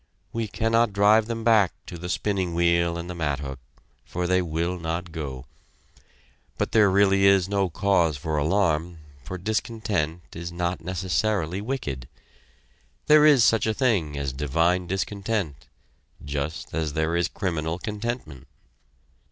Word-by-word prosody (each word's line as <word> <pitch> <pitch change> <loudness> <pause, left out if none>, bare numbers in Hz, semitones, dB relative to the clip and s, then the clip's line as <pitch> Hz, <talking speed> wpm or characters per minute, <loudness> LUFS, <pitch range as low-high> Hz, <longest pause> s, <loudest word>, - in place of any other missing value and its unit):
We 115 -1 -2
cannot 115 +1 +1
drive 105 +2 +4
them 115 -1 -4
back 110 -5 +4
to - - -8
the 90 +1 -6
spinning 95 -3 -1
wheel 85 0 +2
and 85 0 -6
the 90 - -5
mathook, 70 -5 -3 0.4
for 90 0 -3
they 90 +1 +2
will 85 +1 -2
not 85 +1 -4
go. 70 -5 -6 1.1
But - - -1
there 110 -2 +5
is - - +2
really 100 0 +5
no 100 -2 0
cause 85 -4 +2
for 80 +2 -3
alarm, 85 0 +1 0.3
for 95 - -6
discontent 105 -5 -2
is 85 +1 -6
not 85 0 -2
necessarily 95 +1 -1
wicked. 75 - -4 1.0
There 150 0 +7
is 140 -6 +6
such 115 -1 +3
a 110 - 0
thing 95 - +1
as 70 -2 -2
divine 85 +6 +1
discontent 95 - -3 0.6
just 70 +2 -4
as 80 -2 -2
there 80 +2 0
is 85 0 +2
criminal 80 -4 -2
contentment. 105 - -5
90 Hz, 140 wpm, -25 LUFS, 80-105 Hz, 1.1 s, There